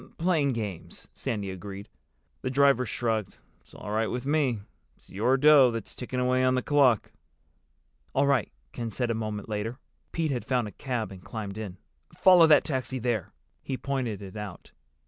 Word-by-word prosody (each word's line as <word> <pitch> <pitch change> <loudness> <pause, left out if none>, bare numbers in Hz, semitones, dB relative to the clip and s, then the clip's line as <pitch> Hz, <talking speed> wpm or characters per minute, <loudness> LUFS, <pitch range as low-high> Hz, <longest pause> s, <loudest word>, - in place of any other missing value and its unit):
"Playing 160 -6 +2
games," 105 -7 -6
Sandy 100 -4 -3
agreed. 100 +2 -8 0.5
The 130 - -2
driver 135 -2 +4
shrugged. 110 -3 -2 0.2
"It's - - -21
all 105 - -7
right 110 +1 +1
with 125 +1 -4
me. 140 -7 +1 0.4
It's - - -20
your 120 +7 +2
dough 145 -2 +7
that's 115 -1 -5
ticking 125 0 -4
away 125 0 +2
on 130 0 +3
the 130 - 0
clock." 135 -7 +3 1.0
"All 140 - +4
right," 140 -5 +2 0.2
Ken 115 - -4
said 120 +2 -1
a - - +1
moment 110 -2 -4
later. 110 +3 -3 0.3
Pete 160 -3 -1
had 125 -3 -2
found 125 -4 0
a - - -8
cab 120 -6 -3
and 95 -2 -11
climbed 105 -2 -6
in. 100 -4 -6 0.4
"Follow 180 -3 +7
that 150 -2 +6
taxi 130 -2 -2
there." 115 -6 -1 0.3
He 135 - -4
pointed 125 -8 -3
it 95 +1 -10
out. 105 -4 -8
120 Hz, 175 wpm, -28 LUFS, 105-135 Hz, 1.0 s, dough